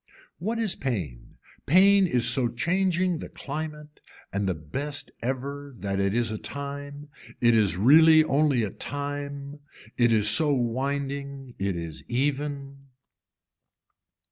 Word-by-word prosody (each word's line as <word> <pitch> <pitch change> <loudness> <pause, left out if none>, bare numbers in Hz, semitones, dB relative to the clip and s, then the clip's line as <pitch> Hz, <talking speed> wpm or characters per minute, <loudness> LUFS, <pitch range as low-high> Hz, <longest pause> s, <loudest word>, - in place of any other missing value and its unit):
What 220 +7 -2
is 220 -5 0
pain, 85 - -5 0.3
pain 195 +4 +6
is 125 -7 +2
so 130 -3 +3
changing 180 +6 0
the - - -7
climate 150 0 -7 0.3
and 100 -1 0
the 90 - -1
best 140 - -5
ever 140 +3 -4
that 100 -2 -3
it 100 +1 0
is 120 -2 +1
a 110 - -4
time, 145 +1 -7 0.3
it 120 -1 +4
is 105 -6 +2
really 155 - +7
only 140 -4 +2
a 100 - -3
time, 145 0 -6 0.4
it 120 -1 +4
is 105 -2 +3
so 150 +8 +4
winding. 135 +2 -3
It 100 -1 -1
is 85 -2 -6
even. 140 +1 -3
140 Hz, 130 wpm, -26 LUFS, 115-150 Hz, 0.4 s, really